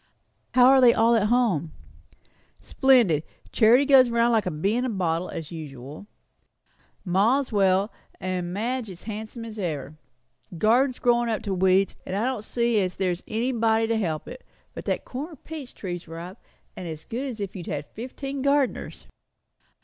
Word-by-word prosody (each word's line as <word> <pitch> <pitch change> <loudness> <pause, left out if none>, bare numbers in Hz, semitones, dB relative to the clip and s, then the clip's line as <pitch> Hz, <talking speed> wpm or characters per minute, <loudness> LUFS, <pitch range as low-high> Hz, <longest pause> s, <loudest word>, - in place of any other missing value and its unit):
"How 250 -1 +7
are 270 0 +6
they 240 -2 +6
all 230 +1 +4
at 210 -2 +2
home?" 210 - +1 0.9
"Splendid! 240 - +3 0.3
Charity 240 +5 +5
goes 265 -3 +6
round 235 0 +2
like 220 -4 +2
a - - +2
bee 180 +7 -1
in 245 - 0
a 255 - -1
bottle, 180 -4 -1
as 160 -1 -7
usual. 150 +1 -9 1.0
Ma's 225 +10 +2
well; 195 0 +2 0.3
and 180 -1 -3
Madge 230 +4 -2
is 180 -2 -10
as - - -19
handsome 220 +2 -7
as 220 -1 -8
ever. 155 -4 -4 0.6
Garden's 245 - +3
growin' 240 -1 +2
up 220 - -2
to 200 - -2
weeds, 190 +1 +2
and 185 - -5
I 210 +4 0
don't 255 -5 -2
see 235 0 +1
as 185 -2 -1
there's 180 -2 -1
anybody 225 -1 +1
to 225 0 0
help 165 -8 -2
it; 255 +1 -9 0.3
but - - -8
that - - -2
corner 300 +6 -6
peach 300 -1 -9
tree's 175 -3 -6
ripe, 170 +5 -8 0.4
and 180 - -7
as 160 -1 -7
good 255 +5 -4
as 240 -5 -6
if 200 -1 -5
you 180 - -6
had 145 0 -3
fifteen 265 - -6
gardeners." 280 -1 0
220 Hz, 170 wpm, -25 LUFS, 180-245 Hz, 1.0 s, How